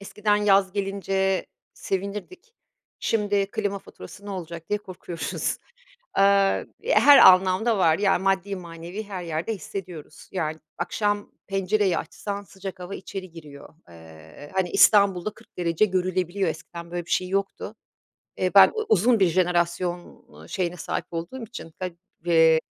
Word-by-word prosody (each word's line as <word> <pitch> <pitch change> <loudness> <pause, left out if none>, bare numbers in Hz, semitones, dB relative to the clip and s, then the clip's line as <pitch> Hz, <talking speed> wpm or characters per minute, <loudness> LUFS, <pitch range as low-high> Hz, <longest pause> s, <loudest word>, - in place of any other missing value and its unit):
eskiden 210 +1 0
yaz 195 -2 +3
gelince 195 -1 -1 0.3
sevinirdik, 210 - -5 0.4
şimdi 205 -2 0
klima 200 -2 -2
faturası 190 - -13
ne - - -6
olacak 170 -3 -7
diye 210 - 0
korkuyoruz. 185 -4 -4 0.6
Eee, 195 0 +3 0.2
her 290 - +7
anlamda 190 +4 +6
var, 165 -3 +4
yani, 195 -2 +2
maddi 195 +1 0
manevi 170 +3 -7
her 195 -3 -6
yerde 165 +6 -3
hissediyoruz. 180 -5 -9
Yani, 160 -4 -2 0.2
akşam 205 +4 -1 0.2
pencereyi 195 -1 +1
açsan 205 -1 -5
sıcak 190 -1 -9
hava 180 +2 -6
içeri 190 0 -7
giriyor. 150 -3 -13
Eee, 80 - -14
hani, 190 -2 0
İstanbul'da 200 -2 +5
40 - - -21
derece 170 +3 +2
görülebiliyor, 185 -1 -1
eskiden 170 +1 -8
böyle 175 -1 -4
bir - - -10
şey 185 - +1
yoktu. 195 +1 -3 0.6
Eee, - - 0
ben - - +9 0.2
uzun 225 +4 +4
bir 190 - +5
jenerasyon, 175 0 -1
ııı, - - -15
şeyine 180 -2 -2
sahip - - -3
olduğum 170 +10 -5
için, 205 -7 -9
ga 185 -1 -2 0.4
eee, 160 -2 +5
190 Hz, 135 wpm, -25 LUFS, 170-200 Hz, 0.6 s, ben